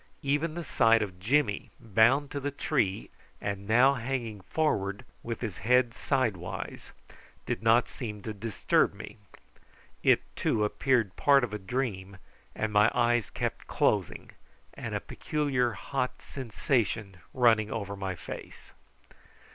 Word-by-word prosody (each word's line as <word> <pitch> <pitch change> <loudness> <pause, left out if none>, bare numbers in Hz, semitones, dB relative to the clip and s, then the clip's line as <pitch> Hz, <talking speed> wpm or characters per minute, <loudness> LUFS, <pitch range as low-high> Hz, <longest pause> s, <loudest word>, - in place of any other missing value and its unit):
Even 150 +3 0
the 170 - -4
sight 115 -6 +4
of 90 -3 -7
Jimmy 115 +1 +1
bound 115 +7 +3
to 145 - -3
the 140 +1 -2
tree, 130 -8 -1 0.3
and 100 -1 -4
now 125 +5 +5
hanging 120 -5 -3
forward 100 - -1 0.2
with 115 -1 -5
his 110 -7 -4
head 125 +2 +3
sidewise, 115 - -2 0.5
did - - -2
not 115 +2 +4
seem 105 -5 -7
to 110 - -4
disturb 105 0 +1
me. - - -9 0.8
It, - - +4
too, 105 - +1
appeared 115 -3 +1
part 140 -2 +5
of 115 -3 -2
a 105 - -3
dream, 100 -3 -3 0.4
and 110 -1 -2
my 105 +1 +6
eyes 120 -3 +2
kept - - -4
closing, - - 0 0.4
and - - -5
a - - 0
peculiar 135 -6 -1
hot 130 0 -3
sensation 115 -5 -2
running 115 -4 +3
over 100 -3 -4
my 95 -2 -4
face. - - -9
115 Hz, 135 wpm, -29 LUFS, 105-130 Hz, 0.8 s, my